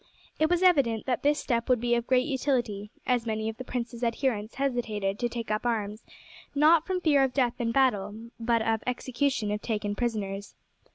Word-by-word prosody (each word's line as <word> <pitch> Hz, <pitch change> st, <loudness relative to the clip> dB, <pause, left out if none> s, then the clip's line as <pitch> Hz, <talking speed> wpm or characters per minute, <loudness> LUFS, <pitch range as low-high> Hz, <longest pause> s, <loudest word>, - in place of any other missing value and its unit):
It 315 Hz, 0 st, +3 dB
was 355 Hz, +1 st, +2 dB
evident 275 Hz, -12 st, +3 dB
that 255 Hz, -2 st, 0 dB
this 290 Hz, +1 st, +3 dB
step 235 Hz, -3 st, -1 dB
would 250 Hz, -2 st, +4 dB
be 240 Hz, +1 st, +1 dB
of 235 Hz, 0 st, 0 dB
great 255 Hz, -1 st, +3 dB
utility, 245 Hz, -8 st, -1 dB, 0.2 s
as 245 Hz, -2 st, +1 dB
many 220 Hz, 0 st, -1 dB
of 225 Hz, -, -7 dB
the 255 Hz, -, -6 dB
prince's 245 Hz, -1 st, -4 dB
adherents 230 Hz, -2 st, -1 dB
hesitated 230 Hz, -7 st, -1 dB
to 240 Hz, -, 0 dB
take 230 Hz, -2 st, -5 dB
up 215 Hz, -, 0 dB
arms, 215 Hz, -2 st, -2 dB, 0.5 s
not 310 Hz, +2 st, +5 dB
from 370 Hz, -1 st, -1 dB
fear 290 Hz, -5 st, +4 dB
of 265 Hz, -2 st, -1 dB
death 250 Hz, -3 st, +1 dB
in 230 Hz, -1 st, 0 dB
battle, 210 Hz, -6 st, +2 dB, 0.2 s
but 230 Hz, -1 st, +1 dB
of 225 Hz, -1 st, 0 dB
execution 250 Hz, -2 st, -1 dB
if 210 Hz, 0 st, -2 dB
taken 210 Hz, -2 st, -2 dB
prisoners. 205 Hz, -4 st, -3 dB
240 Hz, 190 wpm, -28 LUFS, 220-265 Hz, 0.5 s, not